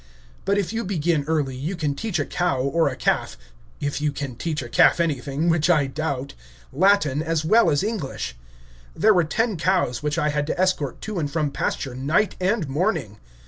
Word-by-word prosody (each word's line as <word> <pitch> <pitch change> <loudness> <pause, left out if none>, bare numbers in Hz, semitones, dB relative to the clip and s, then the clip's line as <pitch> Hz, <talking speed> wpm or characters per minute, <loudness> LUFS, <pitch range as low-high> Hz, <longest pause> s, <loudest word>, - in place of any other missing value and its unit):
But 200 +1 +2
if 200 +1 -1
you 230 +1 -1
begin 170 -5 0
early, 150 -5 0
you 150 +9 -3
can 150 -4 -1
teach 195 +6 -3
a 145 - 0
cow, 175 -7 0
or 145 +5 +1
a 130 - -5
calf 130 - 0 0.4
(if 145 0 -2
you 150 -1 +1
can 135 -3 -5
teach 155 +2 -3
a - - -7
calf 120 - +4
anything, 150 -1 -1
which 165 -1 +2
I 155 -5 +4
doubt), 140 -1 -3 0.4
Latin 155 -4 +3
as 160 -1 -1
well 225 +8 +5
as 145 +5 +1
English. 140 - -3 0.6
There 215 +2 +5
were 175 -3 +3
ten 215 +5 0
cows, 160 -8 +1
which 150 +2 -1
I 150 -3 +1
had 150 0 -1
to - - -3
escort 185 -8 0
to 215 -4 -4
and 145 -3 -1
from 150 -1 -1
pasture 135 -2 -2
night 150 +11 +1
and 190 -2 0
morning. 140 - -1
155 Hz, 195 wpm, -23 LUFS, 140-180 Hz, 0.6 s, well